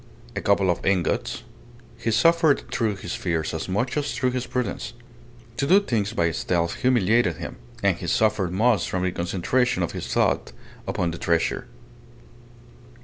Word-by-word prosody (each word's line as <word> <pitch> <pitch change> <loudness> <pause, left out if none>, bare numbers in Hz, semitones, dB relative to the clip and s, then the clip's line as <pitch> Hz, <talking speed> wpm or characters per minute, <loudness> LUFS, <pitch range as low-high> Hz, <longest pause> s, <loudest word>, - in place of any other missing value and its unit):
A 100 - -2
couple 100 -2 +3
of 85 - -4
ingots. 95 -3 0 0.5
He 115 0 -3
suffered 160 +6 +4
through 110 -4 0
his 90 -2 -6
fears 85 -3 -2
as 80 +3 -4
much 120 +7 -1
as 150 -1 -1
through 130 -2 +1
his 125 0 -3
prudence. 125 -3 -3 0.6
To 140 - 0
do 190 +6 +7
things 115 - -1
by 85 -5 +1
stealth 85 +1 -1
humiliated 115 -7 +3
him. 85 - -7 0.3
And - - +3
he - - -6
suffered 105 -5 +2
most 105 0 +2
from 90 -1 -1
the 90 - +1
concentration 90 +5 0
of 85 - -2
his - - -6
thought - - +1 0.3
upon 85 -1 -1
the 85 - -7
treasure. 85 -1 0
100 Hz, 160 wpm, -24 LUFS, 85-125 Hz, 0.6 s, do